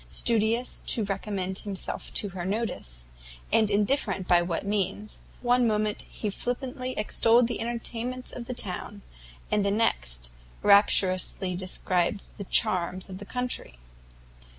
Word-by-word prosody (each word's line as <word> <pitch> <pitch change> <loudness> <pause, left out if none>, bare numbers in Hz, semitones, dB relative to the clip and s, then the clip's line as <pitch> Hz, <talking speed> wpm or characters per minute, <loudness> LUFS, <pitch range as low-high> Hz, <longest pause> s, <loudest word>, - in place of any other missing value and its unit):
Studious 230 +1 +2
to 225 - +3
recommend 195 -1 -3
himself 200 -3 -5
to 205 - +4
her 180 -1 -6
notice, 185 - -3 0.5
and 220 -2 +5
indifferent 200 -3 +1
by 175 -1 +5
what 175 +2 -3
means, 205 +1 -2 0.2
one 245 0 +3
moment 215 -1 -1
he 210 - -4
flippantly 255 +3 -4
extolled 230 +3 +4
the 240 - -3
entertainments 240 +2 -3
of 240 - -7
the 250 - -5
town; 200 0 -3 0.5
and 205 - +2
the 200 - +1
next, - - 0 0.3
rapturously 190 -2 +4
described 185 0 0 0.2
the 200 - -5
charms 185 -2 +2
of 185 - -7
the 205 - -8
country. 250 - -3
205 Hz, 130 wpm, -27 LUFS, 185-230 Hz, 0.5 s, and